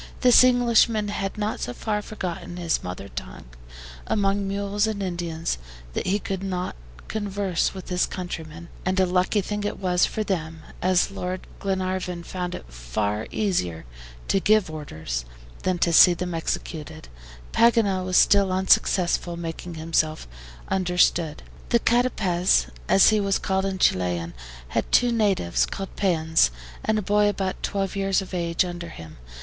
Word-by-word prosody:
This 250 -1 +7
Englishman 235 -4 +3
had 195 0 -3
not 210 +1 -2
so 120 - -3
far 210 - -2
forgotten 180 -4 -6
his 170 -2 -1
mother 90 +2 -6
tongue 60 -11 -8 0.6
among 200 -1 +1
mules 200 +1 0
and 205 -2 -2
Indians 170 - -3 0.3
that - - -3
he 195 +2 +2
could 195 -2 -4
not 185 -2 -3 0.3
converse 200 -4 -1
with 190 - -8
his 180 0 +1
countrymen, 170 -2 -7
and 185 +1 0
a 190 - +5
lucky 185 +3 +1
thing 210 +2 -4
it 205 - -2
was 180 -2 +2
for 215 - -2
them, 165 -5 -3 0.2
as 185 +1 +2
Lord 185 -1 -4
Glenarvan 185 -2 -2
found 180 0 -4
it - - -9
far 100 - -2
easier 90 - -1 0.4
to 195 - +2
give 210 -3 +3
orders 80 - -5 0.4
than 185 -1 0
to 170 0 +1
see 175 +2 +8
them 180 0 -4
executed, 160 -1 -4 0.4
Paganel 225 -5 +3
was 185 0 +1
still 200 -2 +5
unsuccessful 185 -2 +2
in 170 - -7
making 165 +1 -6
himself 160 - -1 0.4
understood. 180 -4 +1 0.3
The 235 - +5
CATAPEZ, 190 - +2 0.2
as 195 - +7
he 215 -1 +3
was 200 -1 +1
called 190 0 -1
in 195 -1 -2
Chilian, 90 - +1 0.4
had - - -2
two 245 -1 +4
natives 200 - +1
called 195 -1 -6
PEONS, 160 - +2 0.3
and 220 - +1
a 215 - -1
boy 205 +2 +3
about 195 -2 -3
twelve 195 -1 -2
years 195 -1 +1
of 190 -1 -7
age 170 0 +1
under 175 -1 -6
him. 80 - -11
185 Hz, 155 wpm, -24 LUFS, 165-200 Hz, 0.6 s, see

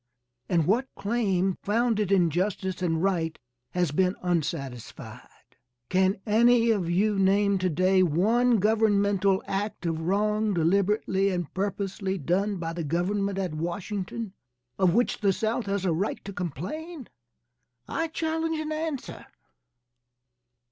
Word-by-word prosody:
And 170 -3 +2
what 235 - +2
claim 195 -4 0
founded 215 -2 +1
in 175 -4 +4
justice 185 +1 -2
and 165 -2 0
right 170 -5 0 0.3
has 175 -4 0
been 185 +5 +1
unsatisfied? 145 -8 -5 0.3
Can 190 +1 +2
any 230 +2 +4
of 190 -6 0
you 200 +3 +2
name 200 +1 +3
to 185 0 +1
day 185 +4 +3
one 220 +9 +3
governmental 200 -2 +2
act 200 -1 -3
of 165 -1 -1
wrong 210 +3 +1
deliberately 195 +3 +2
and 175 -4 -3
purposely 195 0 -2
done 190 +6 0
by 165 -1 -4
the 170 0 -4
government 190 +5 -1
at 185 -4 -2
Washington, 185 +5 -4 0.5
of 185 -2 +3
which 240 +1 +1
the 200 -2 +3
South 220 +3 -1
has 195 -1 -1
a 175 - +2
right 190 +6 -2
to 200 - -6
complain? 230 - -5 0.8
I 330 - -1
challenge 320 0 -2
an 310 0 -4
answer. 310 -3 -4
195 Hz, 130 wpm, -27 LUFS, 180-215 Hz, 0.8 s, in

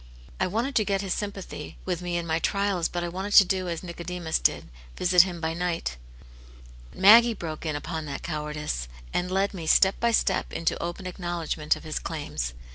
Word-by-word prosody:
I - - +2
wanted 230 +9 -1
to 215 - +4
get 195 -1 0
His 195 -3 -1
sympathy 200 -2 -6
with 180 -2 -2
me 175 -1 -2
in 170 - -3
my 160 0 0
trials, 200 -1 0
but 175 -1 -3
I - - -2
wanted 190 +4 -4
to 200 - +10
do 185 -1 -1
as 170 +1 -4
Nicodemus 170 -1 -3
did, - - +1 0.3
visit 180 0 +6
Him 175 -2 -2
by 160 0 -1
night 170 - -2 0.9
But - - -12
Maggie 230 +4 +8
broke 160 -3 -5
in 155 - -1
upon 160 +2 -4
that 140 -2 -6
cowardice, 150 - -3 0.3
and 180 +1 0
led 195 +2 +1
me, 170 -4 -6
step 190 +4 +4
by 235 - +2
step, 220 -4 +1
into 165 - 0
open 175 +2 -5
acknowledgment 175 -4 -1
of - - -11
His 155 -1 -3
claims. 145 - -4
175 Hz, 200 wpm, -26 LUFS, 160-190 Hz, 0.9 s, to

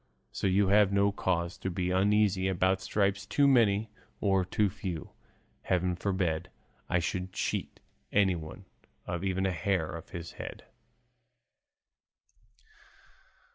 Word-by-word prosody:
So - - -1
you 95 +1 +3
have 100 -1 +5
no 100 0 +3
cause 85 -2 -1
to 95 - -2
be 90 0 -2
uneasy 100 0 +3
about 95 0 +1
stripes 100 0 0
too 140 -1 +3
many 110 -5 +3 0.3
or 95 -2 +2
too 105 +3 +1
few; 95 -5 -5 0.5
heaven 90 -1 0
forbid 90 -3 -1 0.4
I - - +2
should 90 +2 -2
cheat - - -3 0.3
anyone 95 -2 0 0.4
of 85 +1 -3
even 95 0 0
a 95 - +1
hair 85 -2 -1
of 85 +2 -9
his 85 -2 -7
head." - - -8
95 Hz, 125 wpm, -30 LUFS, 90-100 Hz, 0.5 s, have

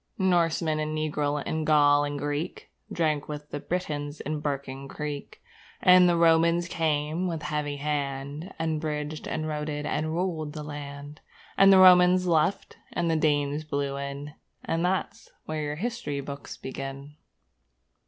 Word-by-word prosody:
Norseman 170 -4 +2
and 155 0 -2
Negro 150 -1 -1
and 160 0 -2
Gaul 145 -1 +5
and 145 0 -3
Greek 145 +4 -4 0.2
Drank 155 -4 0
with 150 0 -7
the 145 - -3
Britons 150 -4 -3
in 150 +1 -3
Barking 140 -2 -4
Creek, 145 0 -6 0.4
And 180 -1 +7
the 170 - +2
Romans 170 +1 +4
came 160 +1 0
with 165 -3 -4
a - - -6
heavy 150 -1 -2
hand, 145 +3 -3
And 160 -1 -1
bridged 150 0 -4
and 155 - -2
roaded 150 -1 -3
and 155 +1 -1
ruled 165 -4 -2
the 155 -1 -6
land, 145 0 -8 0.3
And 195 0 +7
the 190 - +8
Roman 180 -1 +8
left 170 +3 +1
and 170 -1 0
the - - +2
Danes 145 -1 +1
blew 140 -2 -2
in 140 +1 -6 0.3
And 165 +1 -1
that's 190 +4 -2 0.2
where 155 0 -3
your 150 0 -3
history 185 -7 -3
books 140 0 -7
begin! 135 +2 -7
150 Hz, 155 wpm, -27 LUFS, 145-165 Hz, 0.4 s, the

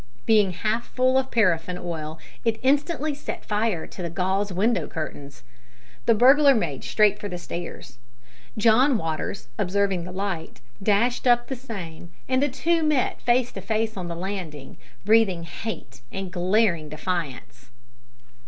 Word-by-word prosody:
Being 210 -4 +4
half 220 +6 -1
full 255 0 +2
of 265 0 -3
paraffin 180 -5 +2
oil 160 -3 -5 0.3
it 225 -2 0
instantly 295 +3 +1
set 290 - -6
fire 210 -5 0
to - - -10
the 170 - -3
gauze 190 +4 0
window 210 +6 +1
curtains. 145 -3 -7 0.6
The 230 - +6
burglar 275 +4 +6
made 165 - -2
straight 210 -1 +3
for 205 - -5
the 180 - -4
stairs. 170 -7 -7 0.6
John 235 +5 +5
Waters, 160 -2 -4
observing 195 -2 +1
the 180 - -7
light, 185 -3 -4 0.2
dashed 225 +6 +2
up 240 0 +4
the 265 - -2
same, 185 -10 -8 0.2
and 260 0 +2
the 290 - +2
two 330 +6 +1
met 300 -5 +1
face 245 0 +2
to 195 - -7
face 220 +2 -1
on 185 -3 -4
the 170 - -4
landing, 175 -6 -6 0.3
breathing 205 -5 +4
hate 165 - -7
and 195 -1 -5
glaring 180 -3 +1
defiance! 145 -7 -5
200 Hz, 150 wpm, -25 LUFS, 170-235 Hz, 0.6 s, The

